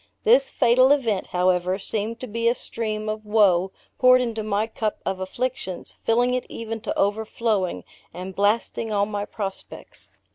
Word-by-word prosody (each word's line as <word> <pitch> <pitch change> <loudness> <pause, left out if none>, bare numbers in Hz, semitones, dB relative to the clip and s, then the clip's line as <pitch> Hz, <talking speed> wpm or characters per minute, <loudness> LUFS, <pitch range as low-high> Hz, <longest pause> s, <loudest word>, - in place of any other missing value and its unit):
This - - +5
fatal 255 - +4
event, 230 -9 +1
however, 180 0 +1
seemed 215 +3 -3
to 255 - -5
be 230 +2 -1
a 235 - +3
stream 215 -2 -4
of 215 0 -3
woe 195 -4 +3 0.3
poured 255 0 +7
into 230 -3 -2
my 210 0 0
cup 220 -1 -3
of 190 -1 -2
afflictions, 190 -1 -4
filling 245 +2 +2
it 255 - -2
even 225 -1 -5
to - - -3
overflowing, 210 -1 0 0.3
and 185 +1 -7
blasting 215 +2 0
all 200 -1 +2
my 205 -1 -3
prospects. 195 -2 -7
215 Hz, 155 wpm, -24 LUFS, 200-230 Hz, 0.3 s, poured